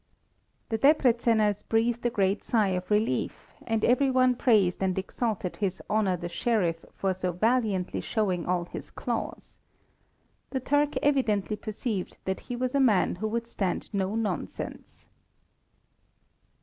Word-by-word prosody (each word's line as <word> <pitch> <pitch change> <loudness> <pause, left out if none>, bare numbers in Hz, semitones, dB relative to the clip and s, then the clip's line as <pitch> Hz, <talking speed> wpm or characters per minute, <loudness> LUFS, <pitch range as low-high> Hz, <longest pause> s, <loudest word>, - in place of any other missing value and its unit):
The 225 -2 -1
Debreczeners 230 -7 +3
breathed 230 +1 +1
a 240 - +2
great 195 -2 0
sigh 215 -4 +2
of 180 -1 -3
relief, 210 +2 -1
and 225 -2 +1
every 265 +3 +4
one 255 -1 +4
praised 210 -9 +3
and 190 -1 0
exalted 195 -1 -2
his 190 -2 -1
Honour 205 -4 +2
the 175 0 -5
Sheriff 175 -3 0
for 195 -1 0
so 185 0 -2
valiantly 210 -1 0
showing 195 -6 -1
all 175 -1 0
his - - -8
claws. - - -5 0.9
The 265 - -2
Turk 290 +3 +1
evidently 225 -8 +2
perceived 210 -2 -4
that 190 0 -1
he 245 - -2
was 255 +1 -2
a 280 - +2
man 215 -9 +3
who 220 - -2
would 230 +2 -2
stand 195 -3 -3
no 195 +1 -1
nonsense. 190 - -4
215 Hz, 140 wpm, -28 LUFS, 190-240 Hz, 0.9 s, every